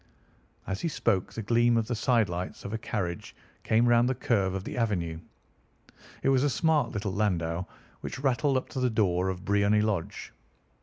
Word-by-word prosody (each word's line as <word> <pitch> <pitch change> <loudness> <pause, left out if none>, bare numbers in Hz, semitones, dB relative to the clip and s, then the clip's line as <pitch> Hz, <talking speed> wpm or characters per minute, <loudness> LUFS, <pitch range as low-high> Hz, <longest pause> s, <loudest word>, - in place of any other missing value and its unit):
As 95 +2 -4
he - - 0
spoke 110 - 0
the 115 - -5
gleam 120 +2 +3
of 115 - +1
the 125 - -2
sidelights 105 -7 0
of 100 - -5
a - - 0
carriage 90 -7 -4 0.3
came 115 +2 +2
round 120 +1 +4
the 130 - 0
curve 95 -7 0
of 95 - -3
the - - -6
avenue. 90 -9 -1 1.0
It - - +3
was 135 -1 +3
a 145 - +3
smart 160 +2 +2
little 100 -3 -3
landau 90 -4 -1 0.3
which - - -6
rattled 135 +1 +1
up 130 - -3
to 130 - -4
the 125 0 +2
door 95 -5 +1
of 95 0 -5
Briony 100 +1 +3
Lodge. 105 -6 -3
110 Hz, 185 wpm, -28 LUFS, 95-120 Hz, 1.0 s, round